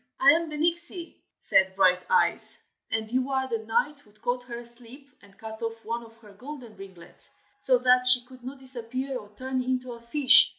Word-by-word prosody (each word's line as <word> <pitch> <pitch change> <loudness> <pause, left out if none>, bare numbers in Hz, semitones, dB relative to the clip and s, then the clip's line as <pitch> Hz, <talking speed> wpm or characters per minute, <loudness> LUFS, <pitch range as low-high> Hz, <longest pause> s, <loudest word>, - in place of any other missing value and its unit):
"I 275 +1 +7
am 330 +1 0
the 300 - -6
Nixie!" 340 +2 -1 0.2
said 190 0 +2
Brighteyes, 195 - +3 0.3
"and 220 0 -3
you 255 +2 -1
are 265 -1 -1
the 230 -3 -3
knight 230 +7 -1
who 210 - -24
caught 245 +4 -3
her 235 -1 -7
asleep 240 +3 -14
and 200 -1 -21
cut 220 0 -10
off 225 0 -6
one 235 +1 -4
of 225 0 -17
her 210 -3 -17
golden 250 0 -11
ringlets, 190 -3 -11 0.3
so 255 -1 +5
that 250 0 +5
she 250 -1 +7
could 255 0 -16
not 265 +3 -8
disappear 260 +1 -3
or 210 -5 -8
turn 260 +2 -3
into 255 0 -3
a 235 -1 -10
fish. 260 +4 +5
250 Hz, 195 wpm, -26 LUFS, 225-265 Hz, 0.3 s, I